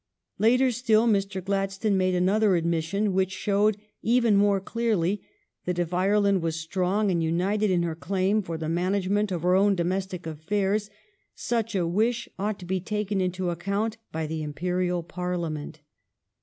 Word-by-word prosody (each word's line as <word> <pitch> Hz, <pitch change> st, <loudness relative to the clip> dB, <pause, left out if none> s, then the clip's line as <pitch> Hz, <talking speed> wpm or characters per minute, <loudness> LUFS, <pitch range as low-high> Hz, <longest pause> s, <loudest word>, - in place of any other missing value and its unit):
Later 250 Hz, +4 st, +4 dB
still, 230 Hz, -1 st, +2 dB
Mr. 195 Hz, -3 st, 0 dB
Gladstone 195 Hz, +1 st, 0 dB
made 185 Hz, -1 st, +2 dB
another 190 Hz, +1 st, +3 dB
admis 165 Hz, -1 st, 0 dB
sion 200 Hz, +3 st, 0 dB
which 190 Hz, 0 st, +2 dB
showed, 205 Hz, +1 st, +1 dB, 0.2 s
even 235 Hz, -2 st, +3 dB
more 200 Hz, 0 st, +4 dB
clearly, 205 Hz, -3 st, 0 dB, 0.4 s
that 180 Hz, -1 st, -1 dB
if 175 Hz, 0 st, -1 dB
Ireland 200 Hz, +1 st, +2 dB
were 165 Hz, -, 0 dB
strong 185 Hz, +5 st, 0 dB
and 170 Hz, -2 st, +1 dB
united 190 Hz, +6 st, +1 dB
in 175 Hz, -2 st, +2 dB
her 170 Hz, -1 st, -1 dB
claim 190 Hz, +5 st, 0 dB
for 170 Hz, -4 st, -5 dB
the 160 Hz, -1 st, -4 dB
management 190 Hz, +4 st, 0 dB
of 175 Hz, -3 st, -3 dB
her 180 Hz, +1 st, +3 dB
own 200 Hz, +1 st, +4 dB
domestic 185 Hz, 0 st, -2 dB
affairs, 195 Hz, +6 st, -1 dB, 0.5 s
such 230 Hz, -2 st, -2 dB
a 180 Hz, -3 st, +1 dB
wish 220 Hz, +8 st, 0 dB
ought 205 Hz, +1 st, -1 dB
to 180 Hz, -, -10 dB
be 185 Hz, +1 st, -1 dB
taken 210 Hz, 0 st, -2 dB
into 180 Hz, -1 st, -1 dB
account 200 Hz, +6 st, -2 dB
by 160 Hz, 0 st, -2 dB
the 160 Hz, +1 st, -4 dB
Imperial 180 Hz, +3 st, -1 dB
Parliament. 170 Hz, -4 st, -4 dB
190 Hz, 160 wpm, -26 LUFS, 175-205 Hz, 0.5 s, Later